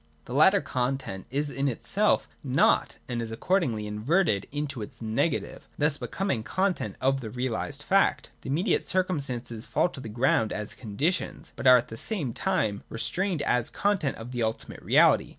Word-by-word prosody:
The - - -7
latter 190 +8 +6
content 125 -6 -3
is 145 +2 -1
in 140 +1 -1
itself 125 - +1 0.2
nought - - +2
and 120 -2 -2
is 115 - -4
accordingly 115 - 0
inverted 105 - +1
into 145 -4 -3
its 115 +3 -8
negative, 115 +8 -2
thus 150 0 +1
be - - -4
coming 190 - -1
content 180 - -1
of 135 +1 +1
the 110 - -6
realised 130 +4 -3
fact. 195 +4 +2
The - - -7
immediate 170 +10 +1
circum 185 -3 0
stances 120 -4 -5
fall 180 - +2
to 145 - -10
the 115 - -7
ground 115 -1 +2
as 105 0 -5
conditions, 135 - -2
but - - -1
are 125 0 +9
at 120 - -3
the 115 - -7
same 150 - -1
time 110 - 0
retained 145 - 0
as 125 -1 +1
content 200 -9 0
of 115 +2 -8
the 120 -1 -3
ultimate 110 0 -3
reality. - - +4
130 Hz, 175 wpm, -27 LUFS, 115-165 Hz, 0.2 s, are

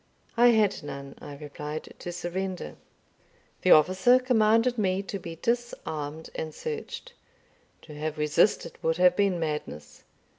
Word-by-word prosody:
"I 240 +1 +6
had 215 -4 +3
none," 140 -1 -7
I 145 -1 -9
replied, 150 +1 -7
"to 175 - -5
surrender." 175 - -4 0.9
The - - +1
officer 185 +10 +6
commanded 235 -1 +3
me 190 -1 +1
to 200 0 -5
be 170 -2 -7
disarmed 160 -9 -3
and 155 -1 -5
searched. 470 +1 -6 0.7
To 155 - -11
have 155 +1 -4
resisted 150 +6 +1
would 160 0 +1
have 180 0 +5
been 195 -3 +2
madness. 150 - -5
175 Hz, 135 wpm, -27 LUFS, 150-215 Hz, 0.9 s, I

